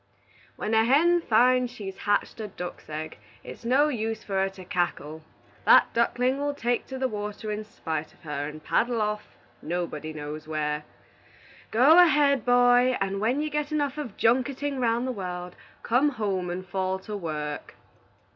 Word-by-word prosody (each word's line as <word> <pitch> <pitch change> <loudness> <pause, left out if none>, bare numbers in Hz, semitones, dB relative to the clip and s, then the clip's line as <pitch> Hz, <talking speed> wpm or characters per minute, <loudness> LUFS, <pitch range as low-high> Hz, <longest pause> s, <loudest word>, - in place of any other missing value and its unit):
"When 215 - -3
a 220 0 +5
hen 335 +8 +4
finds 250 0 +3
she's 195 -5 -7
hatched 205 +2 0
a 215 - -4
duck's 180 -4 -8
egg, 155 +1 -6 0.2
it's - - -10
no 265 +5 +3
use 225 -5 -3
for 200 - -7
her 195 0 +2
to 190 -1 -12
cackle; 160 -4 -2 0.4
that - - +6
ducklin' 250 +3 +1
will 285 0 -1
take 240 -2 -1
to 265 - -6
the 260 0 0
water 210 -1 -5
in 210 +1 -3
spite 160 -7 -5
on - - -28
her, 145 -2 -3
and 155 0 -9
paddle 235 0 +1
off, 210 0 -3 0.3
nobody 160 -2 -4
knows 155 0 -7
where. 150 -1 -2 0.8
Go 275 +10 +6
ahead, 290 -7 +5
boy, 245 +1 +4
and 195 0 -2
when 245 +7 +1
you 305 0 -2
get 300 0 -2
enough 290 -1 -1
of 245 -9 -6
junketin' 265 +4 +1
'round 235 +1 +1
the 260 - -1
world, 180 -4 -6 0.3
come 255 +5 +3
home 195 -8 -2
and 180 +1 -4
fall 190 0 -1
to 210 +2 -7
work." 150 -5 -5
215 Hz, 170 wpm, -26 LUFS, 180-255 Hz, 0.8 s, that